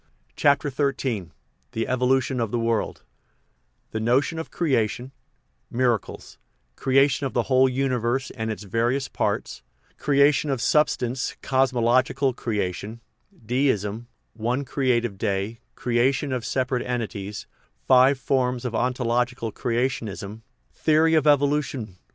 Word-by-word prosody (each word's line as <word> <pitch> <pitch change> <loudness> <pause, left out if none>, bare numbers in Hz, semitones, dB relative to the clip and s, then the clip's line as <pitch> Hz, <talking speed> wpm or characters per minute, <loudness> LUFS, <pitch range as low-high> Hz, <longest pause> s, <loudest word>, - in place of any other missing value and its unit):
CHAPTER 140 0 +2
XIII 130 - -1 0.4
THE 115 - -2
EVOLUTION 130 +1 +1
OF 115 -2 0
THE 120 - -1
WORLD 115 -2 -1 0.9
The 110 - -2
Notion 130 +8 +1
of 160 - -6
Creation 130 -5 -1 0.6
Miracles 120 -3 -2 0.4
Creation 135 +1 +2
of - - -9
the 120 - +1
Whole 130 +1 +4
Uni 130 0 0
verse 120 +3 -1
and 110 0 -4
of - - 0
its 105 - -11
Various 120 +7 0
Parts - - -2 0.4
Creation 145 +1 +3
of 135 -3 0
Substance 125 -2 +1
(Cos 135 0 +2
mological 130 +2 +2
Creation) 105 0 -3 0.5
Deism: 115 -3 0 0.3
One 120 +5 -2
Creative 120 -6 0
Day 100 +2 -2 0.2
Creation 130 +3 +1
of 125 -3 -2
Separate 130 -1 -1
Entities 105 -5 -4 0.4
Five 130 +2 +6
Forms 125 -1 0
of 120 - -3
Ontological 120 -1 0
Creationism 115 -4 -3 0.3
Theory 160 +1 +3
of 155 -2 +3
Evolution 140 -8 +1
I. - - -40
125 Hz, 125 wpm, -24 LUFS, 115-135 Hz, 0.9 s, Five